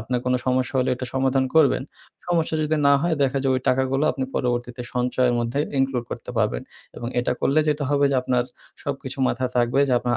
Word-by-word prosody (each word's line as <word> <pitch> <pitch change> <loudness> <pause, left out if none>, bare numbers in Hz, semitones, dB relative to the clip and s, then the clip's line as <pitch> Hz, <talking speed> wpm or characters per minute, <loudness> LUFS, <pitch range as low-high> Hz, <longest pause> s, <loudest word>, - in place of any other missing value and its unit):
আপনার 125 +2 -2
কোনো 125 0 +2
সমস্যা 130 +1 0
হলে 130 - +1
এটা 125 +1 -5
সমাধান 130 0 +2
করবেন। 155 -4 +4 0.4
সমস্যা 170 -2 +1
যদি 155 +1 0
না 140 - +6
হয় 170 -1 +1
দেখা 135 0 +1
যায় 135 -1 +2
ওই 130 - 0
টাকাগুলা 130 +2 +1
আপনি 135 -2 -3
পরবর্তীতে 120 0 -2
সঞ্চয়ের 125 0 +1
মধ্যে 120 +3 -2 0.2
include 135 -2 0
করতে - - -6
পারবেন। - - 0 0.3
এবং 120 - -4
এটা 125 - 0
করলে 145 +3 +3
যেটা 150 -1 0
হবে 145 0 +3
যে 135 - +2
আপনার 125 -1 +1 0.4
সবকিছু 135 -1 -4
মাথা 130 +1 -1
থাকবে 120 +2 +2
যে - - +1
আপনার 120 0 -1
130 Hz, 200 wpm, -23 LUFS, 125-140 Hz, 0.4 s, না